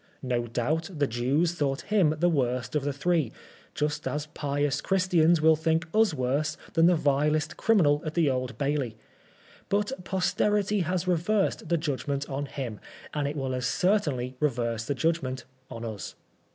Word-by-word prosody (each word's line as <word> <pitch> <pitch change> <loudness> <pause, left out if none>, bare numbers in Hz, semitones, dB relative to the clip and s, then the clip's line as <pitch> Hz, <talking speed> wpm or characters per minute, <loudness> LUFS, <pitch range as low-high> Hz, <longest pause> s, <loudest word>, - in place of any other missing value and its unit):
No 120 -2 -1
doubt 145 - -1
the 145 - +3
Jews 135 +8 +1
thought 145 -3 -1
him 185 -8 +2
the 175 +3 +3
worst 125 -5 0
of 150 - +1
the 145 - 0
three, 150 -2 0 0.4
just 150 0 -1
as 150 0 -2
pious 145 -1 -1
Christians 175 -4 +3
will 160 0 +6
think 160 +1 +1
us 220 -2 +4
worse 145 +2 -1 0.2
than 165 0 +5
the 180 - +5
vilest 150 +1 +1
criminal 155 -10 +3
at 155 -1 -5
tke 155 -6 +3
Old 125 -1 -3
Bailey; 140 -6 -1 0.7
but 205 +3 +1
posterity 205 +2 +1
has 180 0 -1
reversed 180 -1 +1
the 170 - +3
judgment 140 -2 -2
on 140 +1 -3
him, 125 -7 -5 0.3
and 145 -2 -1
it 145 - -3
will 135 -3 -2
as 125 0 -1
cer 190 - +3
tainly 130 -8 -3
reverse 115 -6 -1
the 145 - -1
judgment 135 -3 -1 0.2
on 115 0 -6
us. 105 -5 -6
150 Hz, 165 wpm, -27 LUFS, 130-170 Hz, 0.7 s, will